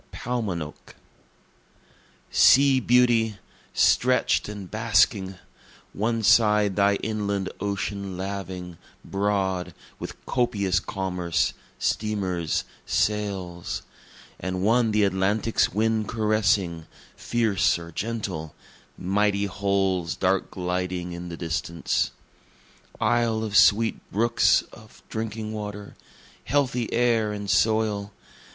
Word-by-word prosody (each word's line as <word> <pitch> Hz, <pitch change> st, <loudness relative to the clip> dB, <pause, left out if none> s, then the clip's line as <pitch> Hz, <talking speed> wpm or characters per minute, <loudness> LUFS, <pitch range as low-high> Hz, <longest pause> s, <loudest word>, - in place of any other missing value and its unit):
Paumanok 100 Hz, -11 st, -4 dB, 1.4 s
Sea 135 Hz, -1 st, +6 dB
beauty! 120 Hz, -4 st, +3 dB, 0.4 s
stretch'd -, -, +3 dB
and 105 Hz, -2 st, -7 dB
basking! 105 Hz, -3 st, +2 dB, 0.6 s
One 115 Hz, +2 st, -1 dB
side 105 Hz, -2 st, +4 dB
thy 100 Hz, 0 st, +3 dB
inland 100 Hz, -3 st, -2 dB
ocean 100 Hz, -1 st, -3 dB
laving, 95 Hz, -3 st, -5 dB, 0.3 s
broad, 95 Hz, -2 st, -1 dB, 0.2 s
with -, -, -7 dB
copious 100 Hz, -7 st, +1 dB
commerce, 90 Hz, -4 st, -1 dB, 0.2 s
steamers, 95 Hz, -7 st, -1 dB, 0.2 s
sails, 95 Hz, -5 st, -2 dB, 0.6 s
And 95 Hz, +1 st, -3 dB
one 115 Hz, +2 st, +3 dB
the 105 Hz, -1 st, +2 dB
Atlantic's 100 Hz, +3 st, +1 dB
wind 110 Hz, 0 st, 0 dB
caressing, 105 Hz, -6 st, +1 dB, 0.3 s
fierce 110 Hz, -8 st, +1 dB
or 85 Hz, 0 st, -9 dB
gentle 95 Hz, -6 st, -4 dB, 0.4 s
mighty 100 Hz, +2 st, +1 dB
hulls 95 Hz, -3 st, 0 dB
dark 95 Hz, 0 st, 0 dB
gliding 90 Hz, -1 st, -3 dB
in 85 Hz, 0 st, -7 dB
the 85 Hz, -, -7 dB
distance. 85 Hz, 0 st, -1 dB, 0.9 s
Isle 115 Hz, -1 st, +1 dB
of 105 Hz, -2 st, -4 dB
sweet 110 Hz, +2 st, +5 dB
brooks 115 Hz, +3 st, +3 dB
of 110 Hz, -1 st, -16 dB
drinking 110 Hz, -1 st, -4 dB
water 105 Hz, -1 st, -6 dB, 0.5 s
healthy 125 Hz, -3 st, 0 dB
air 115 Hz, -3 st, +2 dB
and 105 Hz, -1 st, -5 dB
soil! 105 Hz, -1 st, +1 dB
100 Hz, 95 wpm, -25 LUFS, 95-110 Hz, 1.4 s, Sea